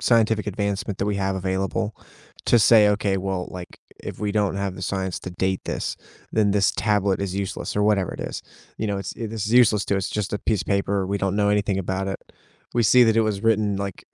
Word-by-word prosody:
scientific 110 -2 +2
advancement 100 -1 -2
that 100 - -1
we 105 -1 0
have 95 0 -1
available 95 +3 -2 0.5
to 120 - +5
say, 110 -1 +6
"Okay, 100 -1 0
well, 95 -1 -3
like, 90 -1 -9 0.2
if - - -7
we 105 -1 -1
don't 100 -2 +1
have 100 -1 -2
the 95 - -8
science 95 -1 -2
to 95 - -7
date 95 +1 -1
this, - - -3 0.4
then 105 -2 +2
this 100 -1 +3
tablet 100 -3 +1
is 100 -2 -3
useless," 100 0 -4
or 105 - +2
whatever 105 -3 +2
it - - -7
is. - - -5 0.4
You 110 - -1
know, 100 -1 -1
it's, 100 - -5
i 115 - -2
this 110 -1 -4
is 110 - -2
useless 115 -5 +5
to 100 - +1
us, 95 - -1
just 105 -2 -3
a 105 - -1
piece 105 -5 +1
of - - -18
paper, 100 -1 0
we 100 +1 -1
don't 95 0 -1
know 105 -1 +2
anything 100 -1 +1
about 95 +1 -2
it. 95 - -3 0.6
We 120 - +3
see 125 +4 +6
that 110 -1 +3
it 115 - +5
was 105 -1 -1
written 110 -3 +2
like, 100 -1 -5
100 Hz, 240 wpm, -23 LUFS, 95-105 Hz, 0.6 s, say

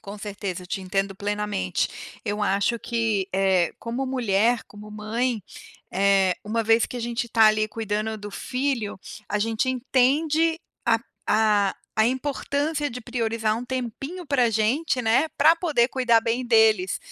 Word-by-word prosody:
Com 200 +1 -9
certeza, 200 -3 -5
eu - - -11
te 195 - -3
entendo 195 +1 -1
plenamente. 205 -2 -1 0.4
Eu 210 -1 -2
acho 200 +4 +1
que, 225 -5 -1
eh, 190 -2 +2
como 240 +3 -3
mulher, 235 -2 +1
como 210 +1 -12
mãe, 215 +2 -2 0.5
eh, 195 -1 +3
uma 225 +2 -1
vez 225 +1 +4
que - - -7
a - - -4
gente 235 0 -2
tá 225 -1 +5
ali 215 0 +3
cuidando 215 0 -3
do 205 0 -8
filho, 250 -3 -2 0.3
a 210 - 0
gente 225 +4 0
entende 300 +6 +2 0.3
a - - +4 0.3
a 210 -2 +3 0.2
a 220 - +4
importância 285 +3 -2
de 245 +1 -7
priorizar 225 -2 -1
um 240 - -5
tempinho 260 +7 -5
pra 280 -4 +2
a 235 - +2
gente, 250 +6 +1
né, 250 +7 +2
pra 315 +3 +7
poder 315 -8 +2
cuidar 245 -3 +3
bem 235 +2 -1
deles, 220 -6 +3
225 Hz, 160 wpm, -24 LUFS, 205-255 Hz, 0.5 s, pra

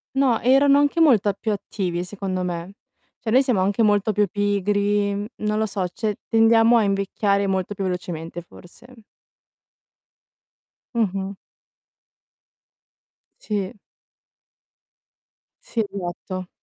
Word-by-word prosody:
no, 265 -4 +3
erano 275 +3 +5
anche 290 +3 +1
molta 225 -11 +4
più 210 +3 -3
attivi 185 -3 -3
secondo 190 -1 -4
me. 175 +1 -4 0.5
Cioè 225 - -5
noi 255 +5 +5
siamo 245 -8 +1
anche 200 +4 +1
molto 205 0 +3
più 210 0 +2
pigri, 205 0 0
mhmm, 200 +1 -3 0.2
non 210 0 0
lo 220 - +1
so, 195 -2 -2
cioè 210 +3 -3
tendiamo 225 +1 +5
a 225 - +3
invecchiare 200 0 0
molto 190 +1 -1
più 195 - -4
velocemente 175 -2 -4
forse. 225 +7 -16 1.9
Mh-mh. 195 -3 -1 2.1
Sì. 205 -1 -3 1.9
Sì, 235 - -1
esatto. 185 0 -6
205 Hz, 110 wpm, -23 LUFS, 190-225 Hz, 2.1 s, erano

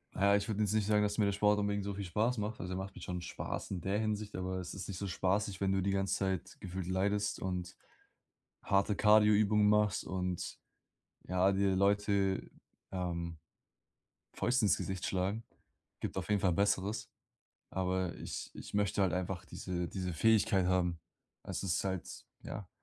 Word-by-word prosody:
Ja, 100 +1 +4
ich 100 - 0
würde 110 -1 -2
jetzt 105 0 +2
nicht 110 -2 +2
sagen, 105 -1 +4
dass 105 0 0
mir 105 - +4
der 100 - +2
Sport 105 +1 +3
unbedingt 100 -1 0
so 100 - -2
viel 100 +1 -4
Spaß 110 +7 0
macht. 105 +1 -3
Also, 90 +1 -4
der - - -2
macht 95 +1 -5
mir - - -10
schon 90 -1 -4
Spaß - - -5
in 95 - -2
der 95 +3 0
Hinsicht, 105 -1 -2
aber 95 0 -2
es 90 - -6
ist 95 - -6
nicht 95 - -4
so 100 - -3
spaßig, 95 +2 0
wenn 95 0 +2
du 95 - +2
die 100 +2 +1
ganze 95 -1 +1
Zeit 95 -2 -2
gefühlt 95 -1 -5
leidest 100 +2 0
und 90 -1 -3 0.9
harte 100 +1 +2
Kardio-Übungen 105 0 +5
machst 105 -2 +3
und 90 -1 -3 0.7
ja, 90 +2 +3
dir 95 -1 +2
Leute, 100 0 +2 0.4
ähm, 85 -3 -3 1.0
Fäuste 120 -2 +2
ins - - +4
Gesicht 95 0 -3
schlagen. 95 +4 -1 0.6
Gibt - - -3
auf 95 - -4
jeden 105 -1 +2
Fall 95 -3 +3
Besseres. 100 +3 +1 0.6
Aber 95 -1 -1
ich - - -6
ich - - -9
möchte 100 -1 +2
halt 95 - +2
einfach 90 0 -2
diese 90 0 -4
diese 90 -2 -3
Fähigkeit 100 0 +3
haben. 90 -2 +1 0.4
Es - - -4
ist 95 -3 0
halt 95 -2 -4 0.2
ja. 100 - -6
95 Hz, 180 wpm, -33 LUFS, 90-105 Hz, 1.0 s, Kardio-Übungen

